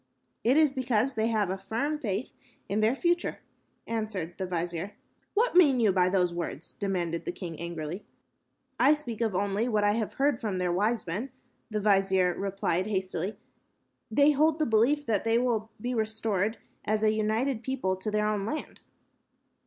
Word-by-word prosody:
"It 250 Hz, +5 st, +4 dB
is 305 Hz, -3 st, +5 dB
because 255 Hz, -1 st, +1 dB
they 220 Hz, 0 st, 0 dB
have 215 Hz, -5 st, +1 dB
a 190 Hz, -, -3 dB
firm 280 Hz, +10 st, -2 dB
faith 210 Hz, -3 st, -3 dB, 0.4 s
in 205 Hz, -, 0 dB
their 220 Hz, +4 st, +3 dB
future," 345 Hz, +3 st, 0 dB, 0.5 s
answered 215 Hz, -7 st, -3 dB
the 190 Hz, -, -2 dB
vizier. 175 Hz, +2 st, -3 dB, 0.4 s
"What 475 Hz, +4 st, +3 dB
mean 290 Hz, -8 st, +6 dB
you 220 Hz, -4 st, +4 dB
by 180 Hz, -1 st, +3 dB
those 180 Hz, -2 st, +2 dB
words?" 170 Hz, -2 st, -5 dB
demanded 175 Hz, -4 st, -2 dB
the -, -, -1 dB
king, 175 Hz, -3 st, -7 dB
angrily. 170 Hz, +2 st, -5 dB, 0.8 s
"I 305 Hz, -, +6 dB
speak 240 Hz, -7 st, -6 dB
only 200 Hz, 0 st, 0 dB
of 240 Hz, -, -3 dB
what 210 Hz, -1 st, +3 dB
I 205 Hz, -, +4 dB
have 215 Hz, 0 st, -2 dB
heard 275 Hz, -3 st, +1 dB
from 205 Hz, -4 st, -2 dB
their 180 Hz, -1 st, 0 dB
wise 215 Hz, +5 st, +1 dB
men," 205 Hz, +11 st, -3 dB, 0.4 s
the 215 Hz, -1 st, -1 dB
vizier 195 Hz, -3 st, +3 dB
replied, 195 Hz, -2 st, -1 dB
hastily. 190 Hz, -1 st, -2 dB, 0.7 s
"They 285 Hz, +6 st, +5 dB
hold 305 Hz, +2 st, +3 dB
the 310 Hz, -, +1 dB
belief 255 Hz, +6 st, +3 dB
that 215 Hz, -5 st, +1 dB
they 225 Hz, 0 st, +2 dB
will 235 Hz, -3 st, 0 dB
be 245 Hz, +3 st, -2 dB
restored 220 Hz, -2 st, 0 dB, 0.3 s
as 215 Hz, 0 st, 0 dB
a 215 Hz, 0 st, +4 dB
united 220 Hz, +3 st, 0 dB
people 245 Hz, -7 st, -1 dB
to 190 Hz, +3 st, -3 dB
their 210 Hz, 0 st, +1 dB
own 210 Hz, -2 st, 0 dB
land." 300 Hz, +9 st, -5 dB
215 Hz, 175 wpm, -28 LUFS, 190-240 Hz, 0.8 s, mean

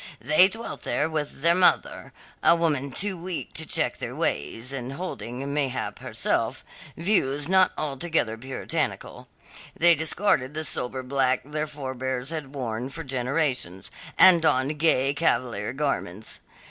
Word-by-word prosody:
They 155 Hz, -, +6 dB
dwelt 225 Hz, +4 st, -6 dB
there -, -, 0 dB
with 150 Hz, -3 st, -4 dB
their 170 Hz, 0 st, +6 dB
mother 180 Hz, 0 st, +2 dB, 0.3 s
a 170 Hz, -, +6 dB
woman 150 Hz, -5 st, 0 dB
too 200 Hz, +6 st, -1 dB
weak 175 Hz, 0 st, -6 dB
to 160 Hz, -, -2 dB
check -, -, 0 dB
their -, -, -5 dB
ways, 115 Hz, -, -2 dB
and 130 Hz, 0 st, -5 dB
holding, 140 Hz, -5 st, -5 dB
mayhap, 140 Hz, -3 st, -2 dB
herself, -, -, -1 dB, 0.3 s
views 145 Hz, -6 st, +1 dB
not 190 Hz, 0 st, +4 dB
altogether 150 Hz, -5 st, -1 dB
puritanical. 130 Hz, +4 st, -4 dB, 0.5 s
They 175 Hz, +1 st, +6 dB
discarded 160 Hz, -3 st, +1 dB
the 155 Hz, -, -2 dB
sober 130 Hz, -2 st, 0 dB
black 130 Hz, -1 st, +1 dB
their 150 Hz, +1 st, -3 dB
forbears 130 Hz, -1 st, -3 dB
had 150 Hz, -4 st, -6 dB
worn 120 Hz, -1 st, -3 dB
for 165 Hz, +4 st, -7 dB
generations, 130 Hz, -, -1 dB, 0.3 s
and 175 Hz, -3 st, +8 dB
donned 145 Hz, -1 st, +1 dB
gay 140 Hz, -4 st, +3 dB
Cavalier 120 Hz, -8 st, 0 dB
garments. 125 Hz, -8 st, -3 dB
140 Hz, 135 wpm, -25 LUFS, 130-165 Hz, 0.5 s, and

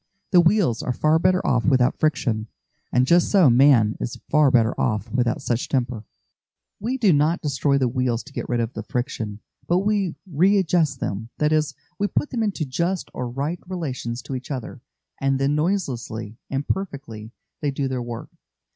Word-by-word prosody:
The 180 Hz, -3 st, +7 dB
wheels 175 Hz, -, +2 dB
are 125 Hz, -, -2 dB
far 155 Hz, +5 st, +3 dB
better 185 Hz, +1 st, +2 dB
off 125 Hz, -2 st, +2 dB
without 130 Hz, -3 st, +3 dB
friction, 115 Hz, -8 st, 0 dB, 0.4 s
and 125 Hz, +1 st, +3 dB
just 170 Hz, +5 st, +4 dB
so 185 Hz, -10 st, +5 dB
man 120 Hz, -4 st, +5 dB
is 120 Hz, -, -4 dB
far 150 Hz, -2 st, +5 dB
better 115 Hz, -2 st, +3 dB
off 110 Hz, -2 st, -1 dB
without 120 Hz, 0 st, 0 dB
such 120 Hz, 0 st, -1 dB
temper. 120 Hz, -5 st, -1 dB, 0.7 s
We 245 Hz, +6 st, -2 dB
do 210 Hz, -8 st, +4 dB
not 150 Hz, +4 st, +2 dB
destroy 140 Hz, -1 st, +1 dB
the 130 Hz, -2 st, +2 dB
wheels 125 Hz, -1 st, -1 dB
to 145 Hz, -, -15 dB
get -, -, -5 dB
rid 120 Hz, -1 st, +1 dB
of 115 Hz, +2 st, -3 dB
the -, -, -5 dB
friction, 115 Hz, -5 st, -4 dB, 0.3 s
but 180 Hz, +3 st, +2 dB
we 200 Hz, -5 st, +1 dB
readjust 180 Hz, -2 st, +2 dB
them; 110 Hz, +3 st, -3 dB
that 150 Hz, 0 st, +1 dB
is, 155 Hz, -1 st, +1 dB, 0.2 s
we 205 Hz, -, +2 dB
put 295 Hz, -, -1 dB
them 240 Hz, -3 st, -1 dB
into 200 Hz, -7 st, -1 dB
just 170 Hz, +7 st, -2 dB
or 125 Hz, -1 st, -4 dB
right 145 Hz, +7 st, -3 dB
relations 130 Hz, -9 st, -4 dB
to -, -, -7 dB
each 130 Hz, 0 st, -5 dB
other, 130 Hz, -2 st, -5 dB, 0.4 s
and 135 Hz, -1 st, +1 dB
then 135 Hz, +2 st, +1 dB
noiselessly 130 Hz, -, -2 dB
and 135 Hz, +1 st, -3 dB
perfectly 135 Hz, -, -4 dB, 0.3 s
they 145 Hz, -, 0 dB
do 135 Hz, 0 st, -2 dB
their 130 Hz, -1 st, -2 dB
work. 120 Hz, -1 st, -7 dB
135 Hz, 180 wpm, -23 LUFS, 120-170 Hz, 0.7 s, The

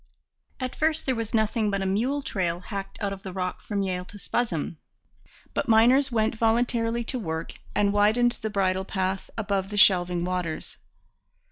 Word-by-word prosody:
At 255 Hz, -1 st, -3 dB
first 315 Hz, 0 st, 0 dB
there 260 Hz, -, +2 dB
was 230 Hz, -2 st, -3 dB
nothing 220 Hz, 0 st, +1 dB
but 200 Hz, -1 st, -1 dB
a -, -, -2 dB
mule 245 Hz, +9 st, 0 dB
trail 175 Hz, -6 st, -1 dB
hacked 195 Hz, +1 st, -6 dB
out 200 Hz, -1 st, 0 dB
of 195 Hz, -, -9 dB
the 190 Hz, -, -7 dB
rock 180 Hz, -1 st, -3 dB
from 200 Hz, -2 st, -2 dB
Yale 180 Hz, -1 st, -2 dB
to 205 Hz, -, -11 dB
Spuzzum; 185 Hz, -7 st, -2 dB, 0.8 s
but -, -, -1 dB
miners 250 Hz, +5 st, +5 dB
went 220 Hz, -2 st, +1 dB
voluntarily 230 Hz, +1 st, +1 dB
to 255 Hz, +2 st, -2 dB
work 160 Hz, -5 st, -4 dB, 0.2 s
and 205 Hz, -1 st, +3 dB
widened 220 Hz, +4 st, +3 dB
the 220 Hz, -, -2 dB
bridle 190 Hz, -2 st, +1 dB
path 190 Hz, 0 st, -2 dB
above 200 Hz, -3 st, -1 dB
the 210 Hz, -, -4 dB
shelving 180 Hz, -3 st, +5 dB
waters. 180 Hz, -3 st, -3 dB
205 Hz, 170 wpm, -26 LUFS, 190-230 Hz, 0.8 s, miners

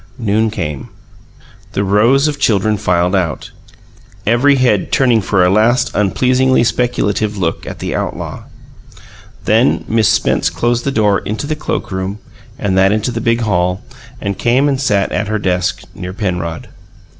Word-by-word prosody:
Noon 110 Hz, -1 st, +1 dB
came. 75 Hz, -10 st, -5 dB, 0.8 s
The 100 Hz, -, 0 dB
rows 115 Hz, +9 st, +3 dB
of 145 Hz, -1 st, -3 dB
children 105 Hz, -3 st, +2 dB
filed 90 Hz, -3 st, 0 dB
out, 85 Hz, -5 st, -2 dB, 0.7 s
every 125 Hz, +5 st, +3 dB
head 125 Hz, -7 st, +1 dB
turning 120 Hz, -4 st, +3 dB
for 95 Hz, -1 st, +2 dB
a -, -, +3 dB
last 120 Hz, +5 st, +2 dB
unpleasingly 130 Hz, +5 st, +2 dB
speculative 110 Hz, -4 st, 0 dB
look 85 Hz, -4 st, -2 dB
at -, -, -6 dB
the -, -, -4 dB
outlaw. -, -, -4 dB, 1.0 s
Then -, -, +2 dB
Miss 110 Hz, -1 st, +2 dB
Spence -, -, +1 dB
closed 120 Hz, 0 st, -1 dB
the 140 Hz, -, 0 dB
door 105 Hz, -5 st, +2 dB
into 110 Hz, +7 st, -4 dB
the 155 Hz, +1 st, -2 dB
cloakroom 95 Hz, -9 st, -4 dB, 0.4 s
and 95 Hz, -2 st, -1 dB
that 95 Hz, +1 st, +4 dB
into 110 Hz, +3 st, 0 dB
the 115 Hz, -1 st, -4 dB
big 115 Hz, +1 st, +1 dB
hall, 90 Hz, -4 st, 0 dB, 0.4 s
and 100 Hz, -1 st, -4 dB
came 125 Hz, +4 st, +2 dB
and 135 Hz, -2 st, 0 dB
sat 105 Hz, -7 st, +1 dB
at 105 Hz, -, -1 dB
her 110 Hz, +1 st, -1 dB
desk, 90 Hz, -2 st, -1 dB
near 90 Hz, +1 st, -7 dB
Penrod. 90 Hz, -5 st, -4 dB
105 Hz, 155 wpm, -15 LUFS, 95-120 Hz, 1.0 s, that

